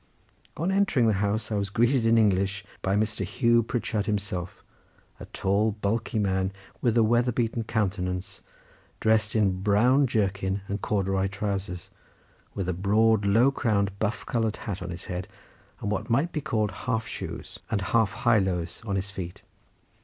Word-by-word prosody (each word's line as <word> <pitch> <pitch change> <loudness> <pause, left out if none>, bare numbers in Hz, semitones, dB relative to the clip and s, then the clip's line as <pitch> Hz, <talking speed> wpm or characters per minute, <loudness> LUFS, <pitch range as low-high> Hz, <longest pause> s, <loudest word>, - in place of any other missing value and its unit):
On 170 +5 0
entering 195 -11 +3
the 110 - +4
house 105 +2 -1
I - - 0
was 100 -1 -1
greeted 120 +3 +2
in 115 0 +5
English 100 -2 +2 0.2
by 95 +1 +1
Mr. 105 -1 0
Hugh 115 +5 +3
Pritchard 110 -2 -2
himself, 100 -4 -3 0.6
a - - -8
tall 100 +3 +1
bulky 110 +2 -2
man 95 -2 +1 0.3
with 120 -1 +2
a 115 - +6
weather 120 +3 +3
beaten 115 0 -1
countenance, 100 -3 -2 0.6
dressed 110 -1 +2
in 110 - +4
a 100 - +4
brown 105 +9 +3
jerkin 100 -3 0
and 100 +1 -3
corduroy 95 -1 0
trowsers, 95 -2 -4 0.6
with 95 -3 -2
a 90 - 0
broad 105 +3 +3
low 115 +7 +5
crowned 105 -7 +1
buff 110 0 -1
coloured 115 -3 -1
hat 100 -4 -4
on 90 - -5
his 85 +1 -7
head, 90 0 -4 0.5
and 105 - -2
what 105 +1 -2
might 140 +9 +2
be 150 - -2
called 110 -8 0 0.2
half 115 -2 0
shoes, - - -7
and 100 -3 0
half 110 -4 +4
high 120 -2 +6
lows 90 -3 -2
on 100 -3 -2
his 100 +1 -3
feet. 90 -3 -7
105 Hz, 170 wpm, -27 LUFS, 95-115 Hz, 0.6 s, a